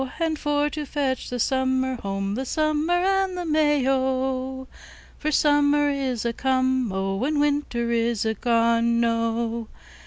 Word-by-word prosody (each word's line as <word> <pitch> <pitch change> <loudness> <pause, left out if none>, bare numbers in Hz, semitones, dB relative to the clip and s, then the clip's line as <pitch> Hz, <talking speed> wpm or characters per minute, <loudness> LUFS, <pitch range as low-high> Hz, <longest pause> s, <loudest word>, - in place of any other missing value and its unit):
And 320 -2 -1
for 295 0 +1
to 305 - -4
fetch 275 -3 -2
the 245 - -3
Summer 260 +1 +1
home, 195 -2 -3
The 255 +5 -2
Summer 310 +3 0
and 380 +1 +1
the 355 - -3
May, 295 -4 +2
O! 260 0 -1 0.5
For 305 - -1
Summer 290 -1 +3
is 260 -4 -2
a 235 - 0
come, 260 -2 0
O! 195 +2 -2
And 295 +2 0
Winter 285 -5 0
is 230 -2 0
a 220 - +1
gone, 235 +1 +2
O! 230 0 -1
260 Hz, 150 wpm, -24 LUFS, 235-295 Hz, 0.5 s, Summer